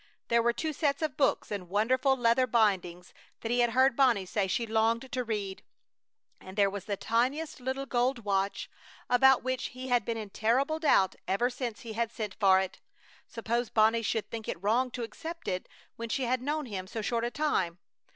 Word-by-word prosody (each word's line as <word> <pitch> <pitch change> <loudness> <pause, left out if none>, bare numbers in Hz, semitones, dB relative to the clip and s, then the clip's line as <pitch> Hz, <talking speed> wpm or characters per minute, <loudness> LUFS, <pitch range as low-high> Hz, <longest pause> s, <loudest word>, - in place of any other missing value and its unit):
There 235 0 +4
were 235 +1 +3
two 310 +6 -3
sets 285 +1 0
of 305 -4 -1
books 270 -5 +1
in 190 -4 -4
wonderful 255 +7 +2
leather 245 +1 +3
bindings 190 -6 0 0.3
that 230 - -3
he 245 - +2
had 240 -1 +4
heard 260 +2 +3
Bonnie 240 -8 +3
say 195 +1 -1
she 230 +5 0
longed 225 +3 0
to 255 -2 -1
read, 205 -4 -4 0.8
and 190 +2 -12
there 200 -1 +4
was 200 -2 -6
the 200 -2 -2
tiniest 265 +10 -1
little 260 +2 -3
gold 245 -2 0
watch, 195 0 0 0.4
about 265 +1 +5
which 255 0 -2
he 260 0 -6
had 245 -2 +3
been 230 +2 -3
in 210 -3 -6
terrible 270 +10 +1
doubt 195 - +3
ever 240 +6 +1
since 245 -3 -5
he 225 -2 -7
had 230 0 -1
sent 210 -4 -5
for 190 -2 +6
it. 190 -1 -4 0.5
Suppose 235 +1 -2
Bonnie 225 +1 +3
should 220 0 -1
think 225 -2 -6
it 170 - -5
wrong 240 +5 +2
to 245 -1 -5
accept 325 +9 -7
it 185 -1 -3 0.3
when 230 0 -5
she 265 - -1
had 250 +1 0
known 295 +3 -2
him 190 -5 -5
so 220 +2 -5
short 235 +1 -1
a 240 - 0
time! 240 - 0
235 Hz, 200 wpm, -29 LUFS, 210-255 Hz, 0.8 s, for